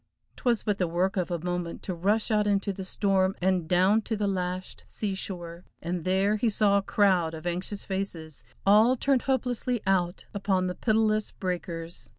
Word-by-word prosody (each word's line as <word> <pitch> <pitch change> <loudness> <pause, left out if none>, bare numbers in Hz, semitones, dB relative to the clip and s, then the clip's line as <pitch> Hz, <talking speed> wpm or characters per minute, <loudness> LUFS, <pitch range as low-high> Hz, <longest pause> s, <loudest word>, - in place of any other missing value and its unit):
'Twas 240 -4 +1
but 205 -2 -1
the 180 - +1
work 180 +3 0
of 180 -3 -1
a 175 - -1
moment 175 0 -4
to 185 - -3
rush 205 +7 +1
out 210 -1 +2
into 200 -1 +1
the 190 - -6
storm 190 0 +1
and 185 -2 +1
down 185 +5 +4
to 220 +1 -3
the 205 - 0
lashed 185 -1 -3
sea 205 -3 -3
shore 175 -3 -6 0.2
and 170 0 -4
there, 195 +3 +2
he 225 +2 +1
saw 205 -1 +3
a - - -2
crowd 185 -5 +2
of 160 +1 -9
anxious 180 +3 -3
faces 180 -6 -4 0.2
all 215 +5 +6
turned 270 0 +2
hopelessly 250 -2 -1
out 180 -2 0
upon 195 -2 0
the 180 - -1
pitiless 215 0 +1
breakers. 170 -2 -5
190 Hz, 180 wpm, -27 LUFS, 180-210 Hz, 0.2 s, all